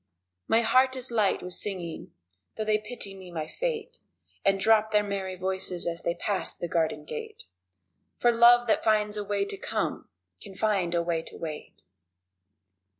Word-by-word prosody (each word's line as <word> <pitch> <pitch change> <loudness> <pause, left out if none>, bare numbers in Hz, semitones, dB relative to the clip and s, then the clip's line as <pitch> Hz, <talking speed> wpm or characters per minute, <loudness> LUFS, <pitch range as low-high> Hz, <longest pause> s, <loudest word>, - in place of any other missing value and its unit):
My 225 - +4
heart 255 +3 +4
is 255 -1 -6
light 215 -4 +1
with 180 0 -5
singing 180 -5 -4 0.4
(though 215 - -3
they 215 0 +2
pity 210 -2 -3
me 190 -2 -11
my 160 -3 -4
fate 485 - -4 0.4
And 195 0 +3
drop 220 +1 +4
their 210 -1 +4
merry 195 -2 -3
voices 185 -1 -2
as 170 0 -2
they 170 - -1
pass 200 -3 -1
the 175 - -4
garden 160 -2 -1
gate) 155 - -7 0.7
For 240 - +4
love 240 +1 +6
that 220 - +2
finds 210 -1 +2
a 210 - -2
way 200 0 0
to 395 - -4
come, - - -3 0.3
can 195 -2 -9
find 190 -5 +1
a 170 - +2
way 170 -1 0
to - - -11
wait! 155 -2 -7
200 Hz, 170 wpm, -28 LUFS, 175-225 Hz, 0.7 s, love